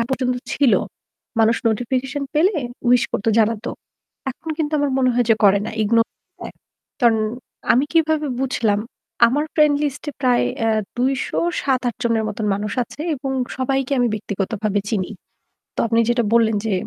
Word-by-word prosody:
আগ -, -, +2 dB
পর্যন্ত 255 Hz, -1 st, 0 dB, 0.2 s
ছিল। 275 Hz, -5 st, +3 dB, 0.7 s
মানুষ 225 Hz, +1 st, +4 dB
নোটিফিকেশন 250 Hz, +5 st, -1 dB
পেলে 350 Hz, +6 st, +3 dB, 0.3 s
উইশ 245 Hz, 0 st, +5 dB
করত 200 Hz, -, -3 dB
জানাতো। 225 Hz, +1 st, +1 dB, 0.6 s
এখন 320 Hz, +5 st, -8 dB
কিন্তু 310 Hz, -1 st, -1 dB
আমার 290 Hz, -1 st, +1 dB
মনে 255 Hz, -1 st, +3 dB
হয় 245 Hz, -1 st, +2 dB
যে -, -, +7 dB
করে 200 Hz, 0 st, +6 dB
না, -, -, -4 dB
ইগনোর 230 Hz, +2 st, +3 dB, 0.3 s
দেয়। -, -, -8 dB, 0.5 s
কারণ 235 Hz, -3 st, +4 dB, 0.5 s
আমি 255 Hz, +4 st, +3 dB
কিভাবে 315 Hz, -2 st, +2 dB
বুঝলাম, 230 Hz, -6 st, +1 dB, 0.5 s
আমার 285 Hz, +6 st, +1 dB
ফ্রেন্ড 300 Hz, -2 st, +4 dB
লিস্ট 290 Hz, -1 st, -2 dB
এ -, -, -14 dB
প্রায় 250 Hz, -3 st, +3 dB, 0.2 s
এ্যা 225 Hz, -, +2 dB, 0.3 s
২০৭-৮ 265 Hz, -1 st, 0 dB
জনের 230 Hz, -2 st, +1 dB
মত 210 Hz, -, -6 dB, 0.2 s
মানুষ 205 Hz, +1 st, -3 dB
আছে 290 Hz, -, -13 dB
এবং 270 Hz, -1 st, -4 dB, 0.3 s
সবাইকে 270 Hz, +1 st, -1 dB
আমি 245 Hz, -1 st, +3 dB
ব্যক্তিগতভাবে 205 Hz, 0 st, -2 dB
চিনি। 200 Hz, -4 st, -1 dB, 0.7 s
তো -, -, 0 dB
আপনি 230 Hz, 0 st, +2 dB
যেটা 240 Hz, 0 st, +2 dB
বললেন 225 Hz, -2 st, +4 dB
যে 220 Hz, -, -1 dB
245 Hz, 155 wpm, -21 LUFS, 225-270 Hz, 0.7 s, যে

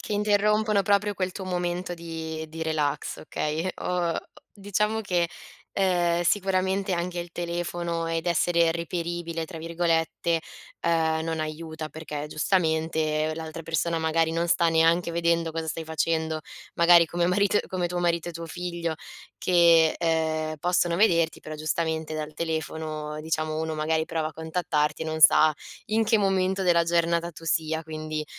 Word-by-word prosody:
Che -, -, -4 dB
interrompono 210 Hz, 0 st, +2 dB
proprio 205 Hz, +1 st, +2 dB
quel 185 Hz, 0 st, -1 dB
tuo 190 Hz, 0 st, -7 dB
momento 180 Hz, 0 st, -2 dB
di 160 Hz, -1 st, -5 dB
di 160 Hz, +1 st, -8 dB
relax, 155 Hz, -3 st, -1 dB
okay. 155 Hz, +3 st, -2 dB
Ho 175 Hz, -2 st, 0 dB, 0.4 s
diciamo 210 Hz, +2 st, 0 dB
che, 175 Hz, -4 st, +1 dB, 0.5 s
ehm, 175 Hz, -3 st, +2 dB
sicuramente 190 Hz, +1 st, +1 dB
anche 175 Hz, +1 st, -2 dB
il 175 Hz, 0 st, -7 dB
telefono 170 Hz, -1 st, -3 dB
ed 165 Hz, +1 st, -2 dB
essere 170 Hz, 0 st, +3 dB
reperibile, 170 Hz, 0 st, -3 dB
tra 165 Hz, -, -9 dB
virgolette, 165 Hz, 0 st, 0 dB, 0.5 s
uhm, 160 Hz, -1 st, +2 dB
non 160 Hz, -1 st, -2 dB
aiuta 155 Hz, 0 st, -5 dB
perché, 150 Hz, -2 st, -6 dB
giustamente, 160 Hz, -2 st, +1 dB
l'altra 160 Hz, 0 st, -6 dB
persona, 165 Hz, +1 st, 0 dB
magari, 160 Hz, 0 st, +1 dB
non 170 Hz, +1 st, 0 dB
sta 170 Hz, 0 st, +3 dB
neanche 165 Hz, +2 st, +3 dB
vedendo 170 Hz, -1 st, +1 dB
cosa 165 Hz, 0 st, -3 dB
stai 160 Hz, +1 st, -3 dB
facendo. 160 Hz, 0 st, -1 dB, 0.4 s
Magari 170 Hz, 0 st, +7 dB
come 175 Hz, +1 st, 0 dB
marito 200 Hz, +3 st, +3 dB
come 180 Hz, -2 st, -1 dB
tuo 180 Hz, -, -4 dB
marito 170 Hz, -1 st, 0 dB
e -, -, -5 dB
tuo 165 Hz, 0 st, -7 dB
figlio, 170 Hz, -1 st, -3 dB, 0.5 s
che, 170 Hz, -3 st, +5 dB
ehm, 160 Hz, -1 st, 0 dB
possono 175 Hz, 0 st, +1 dB
vederti, 170 Hz, -6 st, +3 dB
però 155 Hz, 0 st, -7 dB
giustamente 160 Hz, 0 st, -2 dB
dal 155 Hz, 0 st, -4 dB
telefono, 155 Hz, -2 st, -3 dB
diciamo, 155 Hz, 0 st, -2 dB
uno 160 Hz, 0 st, -2 dB
magari 160 Hz, +1 st, 0 dB
prova 160 Hz, -1 st, -2 dB
a 155 Hz, -, -8 dB
contattarti 160 Hz, -2 st, -1 dB
e 160 Hz, -, -2 dB
non 160 Hz, 0 st, -3 dB
sa 155 Hz, 0 st, +7 dB, 0.4 s
in 220 Hz, +1 st, +2 dB
che 220 Hz, 0 st, +3 dB
momento 190 Hz, -1 st, +1 dB
della 175 Hz, -2 st, +4 dB
giornata 170 Hz, 0 st, +1 dB
tu 165 Hz, -, -13 dB
sia. 160 Hz, 0 st, 0 dB
Quindi, 155 Hz, -1 st, -4 dB
165 Hz, 150 wpm, -26 LUFS, 160-175 Hz, 0.5 s, Magari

